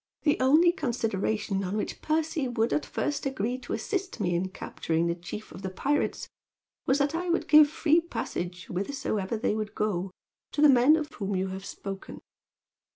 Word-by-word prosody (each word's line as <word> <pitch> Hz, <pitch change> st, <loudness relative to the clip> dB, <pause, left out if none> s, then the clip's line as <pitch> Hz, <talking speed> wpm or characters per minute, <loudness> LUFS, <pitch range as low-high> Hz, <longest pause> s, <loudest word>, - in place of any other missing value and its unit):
The 295 Hz, -, +2 dB
only 310 Hz, +7 st, +5 dB
consideration 220 Hz, -, -1 dB
on 190 Hz, +3 st, -2 dB
which 210 Hz, -, -4 dB
Percy 310 Hz, -2 st, 0 dB
would 235 Hz, -1 st, 0 dB
at 300 Hz, -, 0 dB
first 290 Hz, -2 st, -2 dB
agree 250 Hz, -1 st, -2 dB
to 250 Hz, -, -6 dB
assist 390 Hz, -2 st, -3 dB
me 175 Hz, -, 0 dB
in 180 Hz, +2 st, 0 dB
capturing 165 Hz, -2 st, -2 dB
the 170 Hz, -, +1 dB
chief 175 Hz, +5 st, -8 dB
of 185 Hz, -, -9 dB
the 190 Hz, -, -3 dB
pirates 290 Hz, +10 st, -1 dB, 0.6 s
was 265 Hz, -, +4 dB
that 285 Hz, +1 st, +1 dB
I 350 Hz, +2 st, -2 dB
would 340 Hz, -, +1 dB
give 300 Hz, -1 st, +8 dB
free 320 Hz, +1 st, +3 dB
passage, 180 Hz, -, -4 dB
whithersoever 200 Hz, 0 st, -2 dB
they 215 Hz, -, 0 dB
would 215 Hz, -1 st, -4 dB
go, 195 Hz, -3 st, -1 dB, 0.4 s
to 290 Hz, -, 0 dB
the 300 Hz, -, +9 dB
men 265 Hz, +3 st, +6 dB
of 310 Hz, -2 st, -2 dB
whom 200 Hz, -2 st, -3 dB
you 190 Hz, +1 st, -1 dB
have 190 Hz, +1 st, -6 dB
spoken. 195 Hz, -1 st, -7 dB
230 Hz, 180 wpm, -28 LUFS, 195-295 Hz, 0.6 s, the